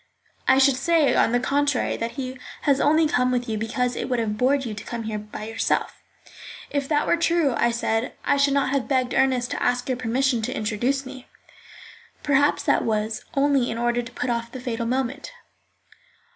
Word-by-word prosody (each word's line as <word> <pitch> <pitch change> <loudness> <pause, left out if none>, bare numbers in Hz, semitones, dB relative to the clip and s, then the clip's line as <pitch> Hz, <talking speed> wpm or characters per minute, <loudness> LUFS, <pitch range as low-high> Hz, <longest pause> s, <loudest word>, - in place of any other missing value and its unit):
"I 265 - +5
should 270 -1 +4
say, 320 +1 +3
on - - +3
the 245 - +2
contrary, 280 +1 0
that 230 0 -4
he 260 -1 -6 0.2
has 280 -2 +2
only 315 +2 +4
come 250 -4 +2
with 245 0 -1
you 220 - -2
because 245 +3 -1
it - - -4
would 250 - +1
have 220 -2 -1
bored 265 +4 +1
you 225 - -4
to 210 - -8
come 235 -1 -5
here 215 -1 -3
by 210 0 -8
yourself." 225 +1 -2 0.7
"If 280 -1 -1
that 295 -1 +2
were 340 - +2
true," 335 -4 +2
I 235 - +2
said, 230 0 -1
"I 285 - +3
should 280 0 +3
not 275 -1 +1
have 275 -3 0
begged 255 -2 0
Ernest 255 -2 +1
to - - -3
ask 245 0 0
your 255 -2 -1
permission 250 +1 +1
to 230 +4 -3
introduce 240 +6 -1
me." 260 -1 -10 1.0
"Perhaps 285 0 +2
that - - +2
was 220 0 -2
only 275 -2 +2
in 230 - -3
order 240 0 0
to 240 +1 -10
put 250 0 -2
off 235 0 -3
the 260 - -7
fatal 235 -2 -3
moment." 265 - -2
255 Hz, 200 wpm, -24 LUFS, 235-275 Hz, 1.0 s, I